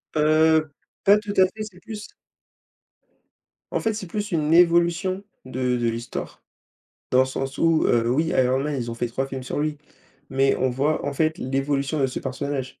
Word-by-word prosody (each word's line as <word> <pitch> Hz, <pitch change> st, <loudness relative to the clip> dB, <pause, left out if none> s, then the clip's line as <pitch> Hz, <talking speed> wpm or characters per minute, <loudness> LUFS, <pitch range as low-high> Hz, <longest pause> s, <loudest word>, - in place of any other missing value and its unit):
Heu, 155 Hz, +1 st, +4 dB, 0.3 s
pas 200 Hz, +1 st, +6 dB
tout 210 Hz, -1 st, -5 dB
à 190 Hz, -, +7 dB
fait, 215 Hz, +3 st, -7 dB
c'est 200 Hz, -4 st, -11 dB
plus 215 Hz, -1 st, -8 dB, 1.6 s
en -, -, 0 dB
fait, 225 Hz, -, 0 dB
c'est 210 Hz, -3 st, -6 dB
plus 205 Hz, +3 st, -4 dB
une 155 Hz, -1 st, +1 dB
évolution 175 Hz, +2 st, +3 dB, 0.2 s
de 125 Hz, -1 st, -1 dB
de 120 Hz, -1 st, +1 dB
l'histoire. 115 Hz, +1 st, -6 dB, 0.7 s
Dans 130 Hz, -, +5 dB
le -, -, +5 dB
sens 135 Hz, 0 st, -4 dB
où, 165 Hz, -1 st, +3 dB
heu, 115 Hz, -1 st, +2 dB
oui 155 Hz, +6 st, +2 dB
Iron 130 Hz, -5 st, +2 dB
Man, 150 Hz, 0 st, -2 dB
ils 120 Hz, -1 st, -3 dB
ont -, -, -4 dB
fait 120 Hz, +1 st, -2 dB
3 135 Hz, +3 st, -2 dB
films 135 Hz, -1 st, -6 dB
sur 125 Hz, -, -4 dB
lui 150 Hz, -1 st, -2 dB, 0.5 s
mais 135 Hz, +1 st, +3 dB
on 130 Hz, -1 st, +1 dB
voit 140 Hz, +5 st, 0 dB
en 145 Hz, -, -1 dB
fait 155 Hz, +2 st, 0 dB
l'évolution 135 Hz, +2 st, -1 dB
de 135 Hz, -, +3 dB
ce 130 Hz, -, -5 dB
personnage. 135 Hz, 0 st, -3 dB
145 Hz, 190 wpm, -24 LUFS, 130-170 Hz, 1.6 s, à